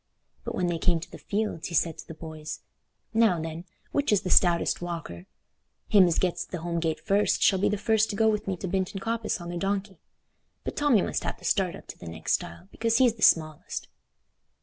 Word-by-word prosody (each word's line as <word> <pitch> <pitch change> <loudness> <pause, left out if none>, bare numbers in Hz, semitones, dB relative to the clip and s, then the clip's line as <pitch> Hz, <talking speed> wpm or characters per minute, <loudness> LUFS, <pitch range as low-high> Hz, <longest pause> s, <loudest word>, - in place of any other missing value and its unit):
But - - -4
when 180 - 0
they 175 -2 -1
came 170 -1 +2
to 165 - -10
the - - -10
fields 210 -5 -2
he 170 - -5
said 165 0 +1
to - - -10
the 165 - -8
boys, 155 -1 -7 0.5
"Now, 220 -6 +4
then, 165 +2 -5 0.3
which 285 -3 +1
is 210 - +4
the 180 - -3
stoutest 175 -2 +4
walker? 165 - -6 0.6
Him 195 -3 +7
as 170 - +1
gets 180 -2 0
to 180 - -6
th' - - -9
home 170 0 -2
gate 160 -1 -1
first 205 -1 +2
shall 190 - +4
be 195 - +2
the 210 - 0
first 220 0 +2
to 205 - -3
go 220 +1 +3
with 210 -1 0
me 190 -2 -1
to 190 - -5
Binton 190 +1 -1
Coppice 225 0 -2
on 175 0 -7
the 175 - -4
donkey. 195 -1 -2 0.6
But - - -4
Tommy 285 -9 +3
must - - -2
have - - -3
the - - -13
start 185 -3 +1
up - - -12
to - - -10
the 85 - -10
next 80 0 -2
stile, 85 +2 -3
because 230 0 +1
he's 245 -3 +5
the 220 - -16
smallest." 155 -5 +2
185 Hz, 230 wpm, -27 LUFS, 165-210 Hz, 0.6 s, Him